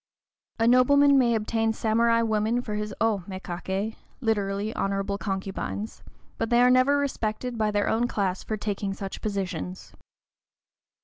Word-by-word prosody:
A 225 0 +2
nobleman 280 +3 +6
may 235 -2 +3
obtain 225 +1 0
samurai 230 +1 +2
women 220 +2 +1
for 215 - -5
his 210 0 -3
"O 215 -4 +1
mékaké" 190 +2 -4 0.2
(literally, 205 -3 -1
honorable 195 0 -1
concubines), 195 +2 -4 0.4
but 225 - -1
they 240 - +4
are 250 - +6
never 255 +3 +4
respected 250 -3 -2
by 215 -2 +1
their 205 -1 0
own 235 +2 +1
class 190 -5 -1
for 215 - -3
taking 200 -1 -3
such 195 -1 -6
positions. 190 -3 -4
215 Hz, 140 wpm, -26 LUFS, 200-235 Hz, 0.4 s, nobleman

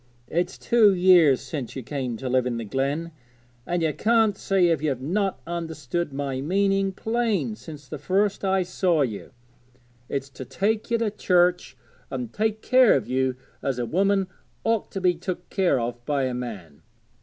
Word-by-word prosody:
It's 175 +3 -1
two 215 -4 +4
years 175 -7 +5
since 140 -7 -6
you 130 - -5
came 130 -3 -3
to 130 - -5
live 125 0 +2
in 120 -2 -2
the 115 - -4
glen, 140 +8 -2 0.6
and 175 -1 0
you 155 -2 +1
can't 225 0 +3
say 190 -3 +2
as 160 -4 0
you've 140 -5 -1
not 190 +8 -1
understood 165 -2 -3
my 135 -1 -3
meaning 195 +4 +1
plain 225 +1 -1
since 150 -8 -11
the 140 - -7
first 195 +7 0
I 190 -1 +2
saw 180 -2 +1
you; 110 -6 -5 0.8
it's 140 0 -3
to 130 0 -8
take 200 - -1
you 235 - +2
to 225 -2 0
church 180 -3 +1 0.3
and 125 -3 -5
take 220 0 -1
care 255 -2 +5
of 130 - -1
you 130 0 0 0.3
as 135 -2 -1
a 120 - -1
woman 195 - +2 0.4
ought 225 -2 0
to 195 - -3
be 180 -1 +4
took 175 +1 -5
care 185 -9 +2
of 120 0 -4
by 145 -2 +1
a 130 -1 -1
man. 100 -12 -7
170 Hz, 180 wpm, -25 LUFS, 130-195 Hz, 0.8 s, years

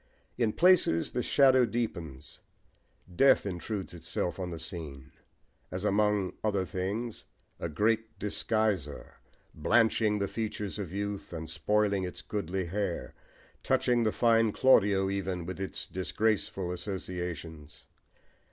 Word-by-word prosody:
In 115 -3 +1
places 175 - +4
the 125 - -1
shadow 130 -1 +5
deepens: 100 - -4 0.8
death 135 0 +5
intrudes 95 +1 -4
itself 85 +2 -3
on 90 -1 -3
the 85 - -5
scene, 80 -6 -7 0.6
as 90 +1 -5
among 105 -2 +2
other 100 -3 +1
things 105 +5 -4 0.3
"a 85 - -3
great 110 +6 0
disguiser," 105 -6 -1 0.4
blanching 110 +5 +3
the 100 -1 -1
features 105 -1 -4
of 95 -5 -5
youth 100 0 -4
and 80 -2 -5
spoiling 100 +5 +1
its 90 -1 -6
goodly 95 -2 -3
hair, 95 0 -3 0.5
touching 120 -1 +2
the 110 -2 +2
fine 115 -1 +3
Claudio 100 -6 +4
even 95 -3 -2
with 95 +2 -6
its 95 - -4
disgraceful 100 -1 -1
associations. 90 -4 -6
100 Hz, 120 wpm, -30 LUFS, 90-110 Hz, 0.8 s, shadow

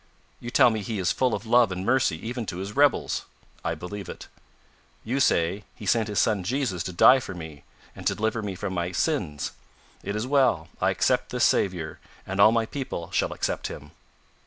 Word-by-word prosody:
you 120 - -6
tell 120 - +5
me 110 -1 -2
He 105 +2 -4
is 90 -3 +1
full 130 -4 +1
of 100 - -7
love 120 -2 +4
and 90 +1 -4
mercy 125 -9 +2
even 120 -2 -4
to 85 - -4
His 100 +2 -6
rebels! 145 0 +2 0.4
I 85 - -1
believe 90 +4 -7
it. - - -9 0.7
You 125 +5 -1
say, 95 -4 +2
He - - -10
sent 115 -3 +2
His 105 -2 -4
Son 105 -4 +2
Jesus 115 -4 -1
to - - -3
die 125 +9 +7
for 95 - -7
me, 80 -4 -9 0.3
and - - -4
to - - +1
deliver 110 +1 -1
me 100 -3 -4
from 95 +1 -4
my 90 0 -2
sins. 85 - -1 0.5
It 100 - -4
is 105 +2 -2
well, 135 -2 +2
I - - +3
accept - - +1
this - - -1
Saviour 85 -5 0 0.3
and 95 +1 -4
all 110 - +8
my 115 -1 +1
people 120 - -5
shall - - +1
accept - - -2
Him." 75 +1 -9
105 Hz, 205 wpm, -26 LUFS, 90-120 Hz, 0.7 s, all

